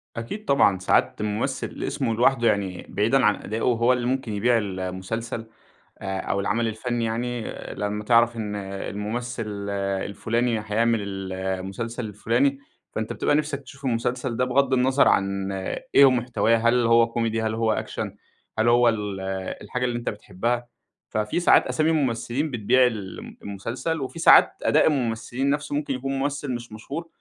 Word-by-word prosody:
أكيد 160 - -6
طبعًا، 100 -9 +4
ساعات 90 - +1
الممثل 105 0 -2
اسمه 115 - -1
لوحده، 120 0 +3
يعني 95 -3 0
بعيدًا 115 +5 +2
عن 105 -1 +4
أدائه 110 +2 -5
هو 120 +1 +3
اللي 120 -1 -1
ممكن 130 -4 -1
يبيع 115 +4 +3
ال 100 -4 -3
المسلسل، 110 +6 -4 0.5
آآ 95 -1 -3
أو 100 - -1
العمل 115 +3 0
الفني 115 +1 -2
يعني، 120 +1 -2 0.3
لمّا 105 +1 -3
تعرف 120 +1 +4
إن 105 -2 -3
الممثل 105 +2 -4 0.3
الفلاني 115 +2 -1
هيعمل 115 +1 +1
ال 95 -1 -5
المسلسل 95 +6 -4
الفلاني 120 +7 0 0.3
فأنت 110 0 -3
بتبقى 145 - +1
نفسك 150 -2 -1
تشوف 135 0 -12
المسلسل 120 0 -1
ده 125 - +2
بغض 135 +1 +2
النظر 130 +2 +4
عن 100 0 +1 0.4
إيه 140 - +9
هو - - +7
محتواه، 115 -2 +2
هل 115 +1 +3
هو 115 0 +5
كوميدي، 115 -1 -1
هل 110 0 -1
هو 115 -1 +1
أكشن؟ - - -4 0.4
هل 110 - +3
هو 120 0 +5
ال 105 -3 -3 0.4
الحاجة 125 0 -2
اللي 120 -1 -1
أنت 120 - -2
بتحبها؟ 115 +4 -3 0.4
ففي 105 +9 -1
ساعات 175 - +5
أسامي 155 +1 +1
ممثلين 135 0 0
بتبيع 125 +2 +3
ال 105 -5 -5 0.2
المسلسل، 120 +10 -4
وفي 135 +5 -5
ساعات - - +7
أداء - - +4
الممثلين 125 -1 -1
نفسه، 145 0 -1
ممكن 145 -2 -1
يكون 135 +1 -3
ممثل 145 0 -2
مش 120 -1 -8
مشهور 140 +10 -6
115 Hz, 160 wpm, -24 LUFS, 105-125 Hz, 0.5 s, إيه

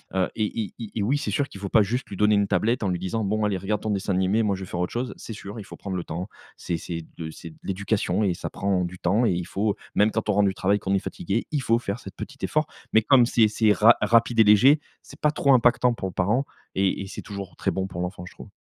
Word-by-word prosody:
heu, 95 - +1
et 110 +1 -1
et 100 - -8 0.2
et 105 - -1
oui 135 +7 +2
c'est 145 - -3
sûr 145 -1 0
qu'il 100 - -11
faut 100 -1 -5
pas 110 - +5
juste 120 +6 -1
lui 100 - -7
donner 105 0 +4
une 100 -1 +2
tablette 110 +5 +1
en - - +1
lui 90 -1 -1
disant: 100 +4 -2
«Bon 105 +2 0
allez 100 -2 0
regarde 100 +2 -2
ton 110 - -3
dessin 100 -1 -1
animé, 95 +5 +2
moi 100 -2 +1
je 95 - -7
vais - - -9
faire 90 - -4
autre 90 - -1
chose». 125 +1 -3
C'est 115 - -8
sûr, 100 +1 -8
il - - -7
faut - - -10
prendre 95 -2 -5
le 85 - -3
temps. 85 +4 -5 0.3
C'est 85 - -3
c'est 85 0 -6
de 80 -1 -5
c'est 85 - -10
de - - -19
l'éducation 100 0 -1
et 95 -3 +2
ça - - -5
prend 95 -2 0
du 90 +1 -8
temps 115 +5 +2
et 105 - +3
il 85 0 -2
faut 105 +1 -1 0.2
même 105 +1 +4
quand 110 -1 -2
on - - +4
rentre 100 0 +3
du 95 - 0
travail, 100 +2 +1
qu'on 95 - -2
est 100 - +3
fatigué, 100 +3 -3
il 145 -3 0
faut 115 0 +3
faire 105 0 -4
cet - - -10
petit - - -8
effort, - - +1 0.3
mais 110 - +6
comme 125 +1 +5
c'est 115 -2 +4
c'est 110 0 +2
ra 115 +3 +6
rapide 115 0 +3
et - - +9
léger, 125 +9 +6 0.2
c'est - - -15
pas 150 - +2
trop 140 -2 +2
impactant 120 0 +4
pour 95 - -4
le - - -12
parent 105 +9 +1 0.3
et 95 0 +1
et 95 - -6
c'est - - -7
toujours 100 -3 -7
très - - -1
bon 95 0 -2
pour 90 -1 -6
l'enfant, 90 0 -4
je - - -12
trouve. - - -12
100 Hz, 295 wpm, -25 LUFS, 95-115 Hz, 0.3 s, et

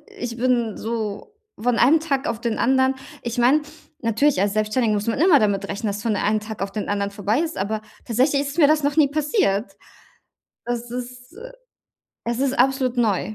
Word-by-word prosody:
Ich 250 - -6
bin 240 -3 +1
so 225 - -4 0.3
von 245 +1 +1
einem 300 +6 +5
Tag 285 -3 -1
auf 225 - -3
den 230 -2 -1
anderen 260 +2 +3 0.3
ich 235 0 -4
meine, 255 +6 +4 0.4
natürlich, 230 +2 +2
als 200 +1 +1
Selbstständige 215 +1 +1
muss 205 +1 -2
man 230 - 0
immer 335 -3 +6
damit 200 -1 0
rechnen, 205 +2 -3
dass 205 0 -3
es - - -8
von 215 -2 0
einem 215 +2 +1
Tag 215 -1 -7
auf 195 0 -3
den 210 - -4
anderen 200 0 -1
vorbei 205 +6 0
ist, 330 0 -3
aber 215 +2 -2 0.2
tatsächlich 260 +5 +2
ist 285 +2 -5
mir 295 - +7
das 305 0 +3
noch 285 +1 0
nie 305 -3 +5
passiert. 290 - 0 0.9
Das 240 0 -3
ist, 250 +2 -7
äh - - -9 0.7
es 235 0 -2
ist 275 -1 0
absolut 260 0 +2
neu. 215 -1 0
240 Hz, 200 wpm, -22 LUFS, 215-275 Hz, 0.9 s, mir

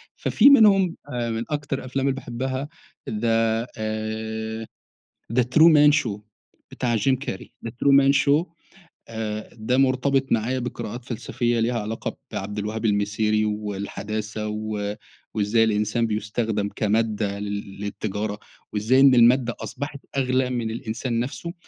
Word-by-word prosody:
ففي 265 +6 +5
منهم 195 -9 +6
أ 120 -3 -2
من 115 0 -2
أكتر 145 -2 -2
الأفلام 130 +1 -3
اللي 135 - +1
باحبها 130 +2 -4 0.4
the 115 +1 +1
آآ، 110 +1 -4 0.7
the 125 - +4
true 155 +7 +6
man 150 -1 +7
show 105 -2 -3 0.5
بتاع 120 -2 -1
جيم 130 +5 +2
كاري 125 -7 -7
the - - -5
true 140 +4 +1
man 140 0 +6
show 150 +4 +3 0.6
آآ، 110 -1 -4
ده 120 +3 -1
مرتبط 135 0 +2
معايا 120 +4 +1
بقراءات 120 -1 -5
فلسفية 120 0 -1
ليها 115 +1 +1
علاقة 110 +2 -4
بعبد 105 +2 -4
الوهاب 110 +2 -3
المسيري 105 +1 +1
والحداثة 105 +1 -4
و 105 -1 -3 0.4
وإزاي 110 +2 +2
الإنسان 110 +1 +1
بيُستخدَم 105 -1 -1
كمادة 105 -2 0
لل 100 -1 -5
للتجارة، 105 0 -3 0.3
وإزاي 110 +5 +3
إن 135 -2 +7
المادة 120 0 +4
أصبحت 145 0 -6 0.2
أغلى 130 -1 +1
من 120 -3 -2
الإنسان 115 +1 -3
نفسه. 140 +7 -4
115 Hz, 135 wpm, -24 LUFS, 105-130 Hz, 0.7 s, man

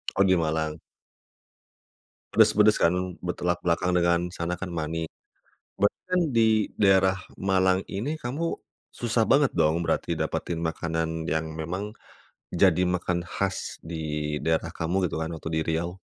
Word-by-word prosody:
Oh 100 - +4
di 95 -1 +4
Malang. 80 -2 -1 1.6
Pedes-pedes 105 +1 +5
kan, 85 - +4 0.3
bertolak 90 0 -2
belakang 90 +1 +1
dengan 85 -1 +3
sana 85 0 -3
kan 90 -1 -6
mani. 80 0 -2 0.7
Berarti 100 +1 +1
kan 180 0 +2
di 110 -2 +4 0.2
daerah 95 -1 +5 0.2
Malang 95 -1 +2
ini 125 +11 -3
kamu 155 +5 -3 0.3
susah 120 -1 -1
banget 140 0 +4
dong 80 +2 +2
berarti 80 - -1
dapatin 85 - -2
makanan 80 0 -2
yang 80 0 -1
memang 90 +7 -4 0.6
jadi 90 - +4
makan 90 -1 0
khas 95 +2 -3
di 75 -2 -3
daerah 80 +1 +1
kamu 90 +3 0
gitu - - -5
kan 80 +1 -3
waktu 80 0 -6
di 80 - +1
Riau? 85 +3 -3
90 Hz, 140 wpm, -26 LUFS, 80-95 Hz, 1.6 s, Pedes-pedes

